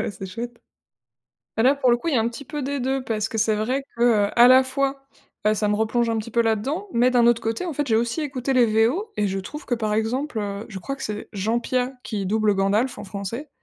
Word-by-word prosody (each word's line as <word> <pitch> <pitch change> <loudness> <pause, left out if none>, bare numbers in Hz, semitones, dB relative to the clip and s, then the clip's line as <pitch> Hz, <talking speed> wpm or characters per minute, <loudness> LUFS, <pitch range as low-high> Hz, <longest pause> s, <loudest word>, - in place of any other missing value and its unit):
Ouais, - - -2
c'est 195 -1 -8
chouette. 235 +5 -7 1.0
Bah, 225 - +3
là, 270 +3 +5
pour 260 -3 +3
le 240 - +4
coup, 290 - -6
il 310 - +1
y - - +3
a - - +3
un 225 - +1
petit 265 +4 -9
peu 295 +3 -5
des 280 +1 -2
2 265 +1 -1
parce 220 -2 -2
que 225 - -4
c'est 220 0 +2
vrai 250 +6 -1
que, 235 - -4 0.3
heu, - - -6
à 240 - +10
la 260 +1 +7
fois, 270 +1 -2 0.4
heu, 215 - +4
ça 210 0 0
me 210 - +2
replonge 230 +2 +1
un 225 - 0
petit 220 +1 -5
peu 235 - +3
là-dedans 245 - -1
mais 245 +2 +3
d'un 240 -2 +4
autre 235 -1 +3
côté, 225 +10 -2
en 335 - -3
fait, 290 +1 -1
j'ai 220 - +2
aussi 235 +7 0
écouté 270 -2 -2
les 250 -2 +5 0.2
VO 395 - -3
et 210 - +1
je 195 0 -2
trouve 300 - -8
que, 245 - 0
par 215 -2 -1
exemple, 230 +4 -1
heu, 205 +1 -4
je 195 -3 -7
crois 275 +9 -4
que 270 - -8
c'est 210 0 -5
Jean 220 +4 0
Piat 255 +2 -1
qui 205 -3 -3
double 215 +1 +2
Gandalf 205 +6 +1
en - - -7
français. 205 +8 -6
235 Hz, 275 wpm, -23 LUFS, 215-265 Hz, 1.0 s, à